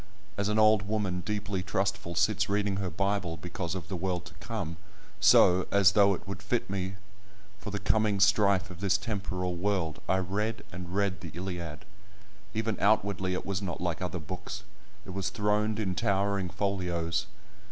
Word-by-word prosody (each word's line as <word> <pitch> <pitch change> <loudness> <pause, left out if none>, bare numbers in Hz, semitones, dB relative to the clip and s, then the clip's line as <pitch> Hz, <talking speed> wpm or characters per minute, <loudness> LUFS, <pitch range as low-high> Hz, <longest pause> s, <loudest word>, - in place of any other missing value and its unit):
As 100 0 0
an 105 - +1
old 110 -2 +5
woman 100 -4 0
deeply 105 0 -2
trustful 95 -2 -1
sits - - +2
reading 100 -1 +1
her 95 -2 -1
Bible 95 -1 -1
because 90 +2 -4
of 85 -5 -5
the 95 - -4
world 90 -1 -2
to 85 - -11
come, 100 -9 -4 0.4
so, 90 +1 +6
as 100 -2 +6
though 100 -1 +5
it - - -12
would 100 -1 -5
fit 100 +1 -1
me 95 -1 -2 0.6
for 105 - -6
the 105 - -2
coming 105 0 +2
strife 100 -2 +4
of 85 - -10
this 100 0 +2
temporal 90 -4 -3
world, 90 -5 -1
I 95 - +4
read 105 +4 -1
and 90 0 -7
read 100 -1 0
the 85 - -6
Iliad. 85 -4 -5 0.7
Even 110 -1 -1
outwardly, 100 -3 +2
it - - -4
was 95 -1 -2
not 90 -4 -4
like 90 -1 -2
other 90 0 -2
books; 90 +5 -6 0.4
it 95 - -7
was 95 -1 -1
throned 105 +1 +1
in 95 -4 0
towering 100 0 +1
folios. 90 -3 -1
95 Hz, 175 wpm, -29 LUFS, 90-100 Hz, 0.7 s, so